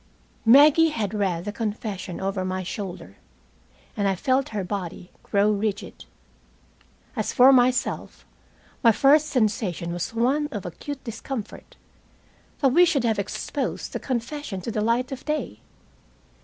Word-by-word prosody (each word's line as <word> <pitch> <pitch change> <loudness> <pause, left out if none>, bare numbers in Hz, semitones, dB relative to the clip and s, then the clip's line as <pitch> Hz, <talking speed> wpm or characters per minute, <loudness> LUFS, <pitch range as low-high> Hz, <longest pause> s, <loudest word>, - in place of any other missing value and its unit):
Maggie 295 +6 +7
had 220 -8 -3
read 190 -4 -1
the 205 - -3
confession 205 -4 -4
over 195 0 -2
my 185 0 -3
shoulder, 180 - -7 0.8
and 200 - 0
I 195 - +1
felt 260 +6 0
her 210 -3 -3
body 180 -2 -5
grow 205 +1 +2
rigid. 210 0 -3 1.1
As - - -1
for 265 0 +7
myself, 250 -1 +1 0.6
my 230 - +6
first 290 +6 +4
sensation 205 - -1
was 175 0 -3
one 270 +6 +1
of 210 -10 -6
acute 260 - -7
discomfort 230 -1 -7 0.9
that 275 - +5
we 335 +8 +5
should 305 -7 +2
have 225 -3 +1
exposed 200 - -4
the - - -2
confession 250 -3 -4
to 230 - -4
the 215 -1 -1
light 235 +5 0
of 265 -1 -6
day. 305 0 -3
225 Hz, 140 wpm, -24 LUFS, 195-265 Hz, 1.1 s, Maggie